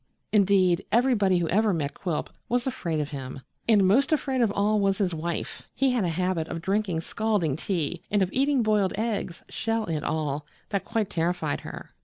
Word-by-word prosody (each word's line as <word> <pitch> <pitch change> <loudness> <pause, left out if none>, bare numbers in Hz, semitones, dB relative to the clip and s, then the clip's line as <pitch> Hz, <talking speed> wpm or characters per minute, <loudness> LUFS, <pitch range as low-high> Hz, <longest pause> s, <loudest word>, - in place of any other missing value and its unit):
Indeed, 195 -3 +4
everybody 225 -6 +3
who 170 -1 0
ever 210 +2 +3
met 145 -3 -2
Quilp 170 -5 -3 0.2
was 245 0 +1
afraid 170 -12 -2
of 150 -1 -3
him, 135 -2 -6 0.3
and 205 -4 +5
most 255 +11 +3
afraid 270 -4 +1
of 230 - +4
all 210 +1 +2
was 195 -1 +2
his 185 -4 0
wife. 165 +1 -4
He 270 -1 +2
had 245 -4 +1
a 175 - +1
habit 175 -1 -1
of 165 - -4
drinking 190 -1 0
scalding 205 - 0
tea 170 -1 -2
and 205 -1 +3
of 185 - -3
eating 275 -1 +2
boiled 210 -3 +2
eggs, 215 -6 -2
shell 225 -1 -1
and 155 -5 -2
all, 150 -1 -2 0.2
that 200 -2 -2
quite 225 -3 -1
terrified 165 -3 0
her. - - -9
195 Hz, 190 wpm, -26 LUFS, 165-220 Hz, 0.3 s, and